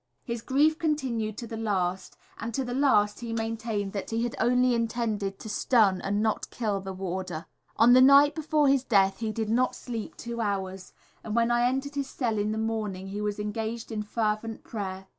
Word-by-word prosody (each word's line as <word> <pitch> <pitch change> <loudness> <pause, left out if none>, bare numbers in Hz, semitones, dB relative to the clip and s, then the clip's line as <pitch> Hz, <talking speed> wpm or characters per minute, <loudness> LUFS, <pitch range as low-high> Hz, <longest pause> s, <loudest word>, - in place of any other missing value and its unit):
His 235 -2 -4
grief 300 +6 +2
continued 255 -9 -1
to 235 - -5
the 225 - -6
last, 190 -4 -2 0.2
and 225 +1 -4
to 270 - 0
the 245 -1 -4
last 215 -7 +3
he 230 -1 -5
maintained 225 -3 -2
that 200 - -4
he 230 +1 -1
had 240 - -2
only 250 +1 +3
intended 225 -4 -1
to - - -9
stun, 210 -3 +3
and 205 +2 0
not 220 -1 +1
to - - -7
kill 210 -4 -2
the 190 0 -6
warder. 185 -3 -4 0.3
On 240 +2 +7
the 255 - +8
night 280 +2 +7
before 305 -2 +1
his 270 -1 +3
death 195 -6 +3
he 220 -1 -2
did 220 -1 -2
not 250 +2 +2
sleep 230 -4 -6
two 235 0 -5
hours, 190 -3 -3 0.3
and 215 -1 -4
when 235 0 +3
I 240 0 +3
entered 270 +3 -2
his 280 -1 -3
cell 230 -5 -1
in 210 +1 0
the 215 - -2
morning 215 -4 -3
he 205 +2 -4
was 210 -1 -2
engaged 220 +3 -4
in 215 -1 -2
fervent 215 +1 -2
prayer. 190 -3 -5
225 Hz, 205 wpm, -27 LUFS, 205-245 Hz, 0.3 s, the